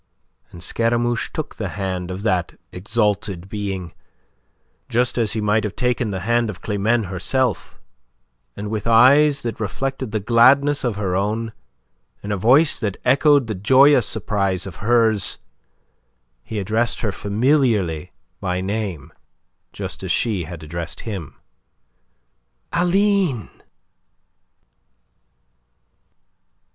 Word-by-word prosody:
And 85 - -9
Scaramouche 120 +3 0
took - - -5
the - - -3
hand 95 -2 -3
of 95 +2 -6
that 95 -5 -1
exalted 100 -2 -1
being, 95 -5 -5 1.0
just 120 +2 +1
as 110 -3 +1
he 110 - -2
might 105 +1 +1
have 105 -2 -4
taken 125 -2 0
the 95 -2 -4
hand 120 +3 +1
of 95 - -7
Climene 110 +3 +1
herself, 100 +8 -2 0.8
and 105 +1 -5
with 110 0 -3
eyes 140 +6 +5
that 115 -3 -4
reflected 130 +4 -3
the 110 - -1
gladness 130 +7 +4
of 120 -5 -1
her 95 -3 -2
own, 110 +3 -1 0.7
in 105 - -4
a - - +1
voice 135 - +4
that 100 -5 -3
echoed 145 -1 +4
the 110 - -3
joyous 130 +6 +5
surprise 100 -4 -1
of 95 -3 -8
hers, 110 -2 +2 1.1
he 110 - -6
addressed 110 +4 0
her 110 - -1
familiarly 105 - 0 0.3
by 90 -2 -2
name, 95 -6 -4 0.6
just - - -6
as - - -3
she 105 -8 0
had 80 0 -9
addressed 85 +2 -6
him. 95 -10 -6 1.4
"Aline!" 180 - +1
110 Hz, 120 wpm, -21 LUFS, 95-120 Hz, 1.4 s, eyes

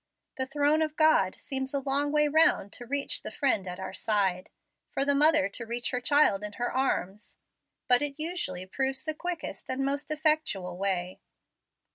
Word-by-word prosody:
The 260 0 -1
throne 290 +3 +2
of 310 -1 -1
God 310 -13 +3
seems 265 0 -4
a - - +1
long 280 +1 0
way 300 0 +3
round 315 - +3
to 245 - -7
reach 280 +2 -1
the - - -6
friend 235 -9 0
at 180 +1 -6
our 190 - -6
side, 195 -4 0 0.4
for 275 - -1
the 285 - +3
mother 300 0 +4
to 220 - -6
reach 240 +2 -2
her 250 -1 -2
child 285 -8 +3
in 210 0 -5
her 245 +3 -3
arms, 210 -6 -2 0.5
but 245 +1 +6
it 290 -1 -1
usually 305 - -3
proves 265 +6 -2
the 310 0 -2
quickest 345 +1 -6
and 265 +1 -1
most 280 +1 -2
effectual 305 - 0
way. 185 -1 -2
270 Hz, 180 wpm, -28 LUFS, 205-300 Hz, 0.5 s, but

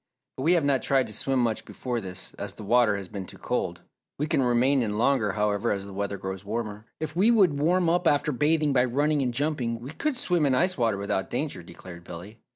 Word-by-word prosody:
But - - -6
we 165 +6 +4
have 170 -5 +2
not 140 -2 +2
tried 135 -2 +2
to 110 - -7
swim 135 +5 0
much 115 -3 0
before 120 -2 -4
this, 95 -2 -7
as - - -7
the - - -9
water 115 -1 +3
has 100 -2 -6
been 95 0 -7
too - - -12
cold. - - -2 0.4
We 150 - 0
can 145 - +1
remain 125 +2 +3
in 105 -3 -1
longer, 120 -4 +2
however, 105 +1 0
as 100 -1 -2
the 100 - -9
weather 100 0 -3
grows 95 0 -6
warmer." 105 0 -4
"If 155 0 -4
we 195 +6 +4
would 190 -11 +4
warm 175 +3 +3
up 175 +2 +2
after 145 +1 +2
bathing 150 +2 +2
by 125 -1 +4
running 145 +4 +1
and 125 -2 0
jumping 125 -3 -1
we 125 +4 -8
could 265 - -2
swim 175 -10 +1
in 130 - +2
ice 180 +7 +2
water 115 -4 +1
without 100 +1 -2
danger," - - -3
declared 85 -2 -11
Billy. 90 +6 -10
125 Hz, 235 wpm, -26 LUFS, 105-150 Hz, 0.4 s, we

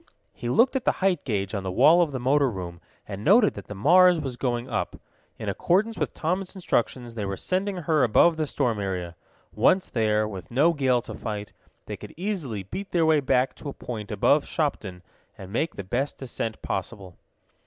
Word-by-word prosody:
He 120 - -5
looked 240 - +3
at 260 - 0
the - - +2
height 190 -1 0
gauge 100 -6 -2
on 100 - -2
the 95 - -4
wall 150 - +5
of 165 -4 +1
the 130 - -3
motor 135 +2 +2
room, 90 -5 -7 0.3
and 100 0 -6
noted 210 - +5
that - - -10
the 105 - -7
Mars 180 - +5
was 135 -4 -4
going 120 -1 -2
up. - - -2 0.4
In - - -7
accordance 210 +6 +1
with - - -3
Tom's 185 +4 -2
instructions 120 -8 -1
they 110 -2 -4
were 100 -1 -3
sending 190 +2 -1
her 160 -4 +1
above 145 +8 +4
the 155 -1 -2
storm 125 -7 -1
area. 90 -3 -4 0.4
Once 185 0 +3
there, 110 -2 +1
with 95 -4 -8
no 150 +8 +3
gale 130 -5 +1
to - - -8
fight, 105 -1 -6 0.3
they - - -6
could - - -11
easily 165 - -3
beat 195 - -7
their 170 -2 +2
way 160 -1 +4
back 130 -1 +1
to 145 - -7
a - - -6
point 110 -4 -7
above 140 +8 +2
Shopton, 100 - -3 0.3
and 95 +1 -10
make 160 +8 -1
the 100 - -5
best 125 +9 -2
descent 115 -4 -5
possible. 95 -2 -5
130 Hz, 200 wpm, -25 LUFS, 105-165 Hz, 0.4 s, wall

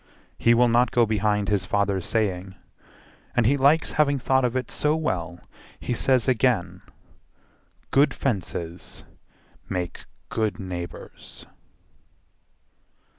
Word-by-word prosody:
He 115 0 +4
will 120 +1 +4
not 120 +1 +3
go 120 0 +3
behind 105 -1 0
his 100 -1 +1
father's 100 -2 -1
saying, 95 -4 -1 0.8
And 120 - +3
he 135 +6 +4
likes 140 +4 +3
having 145 -2 +2
thought 130 +1 +1
of 125 0 0
it 130 -2 -2
so 150 +1 +1
well 90 - -3 0.4
He - - -3
says 130 +1 +2
again, 125 -6 +1 1.1
"Good 140 +2 +4
fences 90 -7 -4 0.7
make 90 -2 -4 0.2
good 110 -2 -1
neighbours." 90 -3 -8
110 Hz, 115 wpm, -24 LUFS, 95-130 Hz, 1.1 s, He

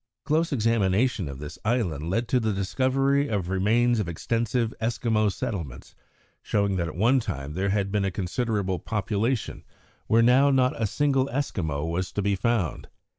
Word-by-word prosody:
Close 160 +2 +1
examination 110 - +1
of 70 - -7
this 75 +2 -8
island 95 - -1
led 115 +6 0
to 125 - +2
the 110 -2 0
discovery 135 +8 +1
of 100 -8 -2
remains 115 +5 +2
of 100 -5 -2
extensive 115 +6 -1
Eskimo 110 -2 +1
settlements, 95 - -5 0.5
showing 100 -2 0
that 85 -2 -1
at 75 - -7
one 120 +8 +3
time 75 - -5
there 95 +4 -1
had 100 -1 0
been 105 -1 +1
a - - +1
considerable 95 0 -2
population 110 +3 -2 0.4
where 115 +1 +4
now 130 +4 +5
not 130 -2 +3
a 110 - +2
single 135 +3 +1
Eskimo 85 - -2
was 90 +3 -2
to 105 - -2
be 100 0 +1
found. 105 -3 -1
110 Hz, 165 wpm, -26 LUFS, 95-120 Hz, 0.5 s, now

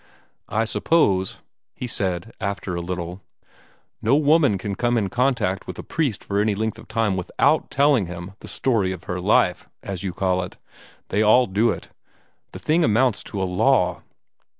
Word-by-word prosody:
"I 110 +1 +1
suppose," 100 - +1 0.3
he - - -5
said 95 -2 -3
after 100 -2 -3
a 85 - -2
little, 90 +1 -5 0.8
"no 115 +5 +3
woman 145 -6 +4
can 100 +1 -4
come 120 +4 +1
in 100 -4 0
contact 120 -4 0
with - - -6
a - - -6
priest 140 -11 -2
for 100 0 0
any 105 -1 +1
length 110 +2 -2
of - - -13
time 110 -4 0
WITHOUT 140 - +1
telling 140 - +3
him 85 +2 -7
the - - -11
'story 115 -7 0
of 95 - -10
her 90 0 -4
life,' - - +2
as 95 -3 -5
you 95 - -2
call 95 0 0
it. 90 - -7 0.5
They 105 - +1
all 110 +4 +5
do 105 +4 +2
it. - - -4 0.6
The - - -8
thing 165 +3 +1
amounts 115 +1 +2
to 100 - -5
a 95 - +1
law." 90 0 +2
105 Hz, 175 wpm, -23 LUFS, 95-120 Hz, 0.8 s, all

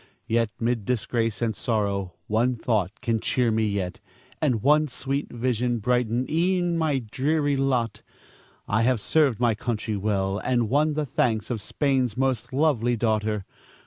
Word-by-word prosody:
Yet, 115 -1 +1
'mid 115 -1 0
disgrace 115 0 -1
and 110 -2 0
sorrow, 100 -5 -1
one 120 +4 +1
thought 110 -4 -1
can 115 -3 0
cheer 125 -1 +1
me 110 0 +1
yet, 100 +1 -3 0.4
and 125 -9 +1
one 150 +2 +4
sweet 135 +2 -3
vision 120 0 0
brighten 125 +2 +1
e'en 175 +1 +1
my 160 -4 +1
dreary 145 +2 +1
lot. 130 -4 0 0.7
I 110 +2 +1
have 125 0 +2
served 140 0 +2
my 120 -2 +3
country 110 -1 -3
well, 100 -1 0
and 120 -3 0
won 150 +2 +3
the 155 -1 0
thanks 115 -4 0
of 115 -4 -2
Spain's 130 -1 0
most 130 -2 0
lovely 130 -4 +2
daughter. 110 -2 0
120 Hz, 150 wpm, -25 LUFS, 110-135 Hz, 0.7 s, one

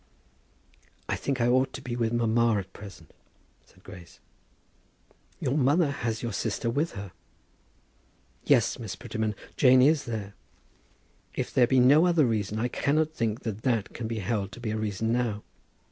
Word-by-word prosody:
"I - - 0
think 135 -2 -3
I 120 - +2
ought 130 +2 +2
to - - -7
be 120 -1 -4
with 115 -2 0
mamma 115 -1 +2
at 95 -1 -6
present," 95 -7 -12 0.5
said - - -24
Grace. 85 -2 -13 1.2
"Your 130 - -1
mother 145 +2 +3
has 115 -5 -3
your 115 -3 -3
sister 115 +3 -2
with 150 +7 -1
her." 100 -2 -7 1.3
"Yes, - - +2
Miss - - -5
Prettyman; 110 -1 -3 0.2
Jane 130 -1 +6
is 150 +1 +3
there." 105 -4 -5 1.0
"If - - -3
there 125 -2 +4
be 130 +1 +3
no 145 +7 +6
other 165 -5 +4
reason, 110 -3 -1
I 115 +3 0
cannot 155 +5 0
think 115 -3 -2
that 110 -2 -5
that 115 -5 -1
can 115 - -5
be 115 0 -4
held 105 -1 -2
to - - -10
be 115 -3 -3
a - - -2
reason 110 +1 -2
now. 115 -4 -1
115 Hz, 165 wpm, -27 LUFS, 110-130 Hz, 1.3 s, Jane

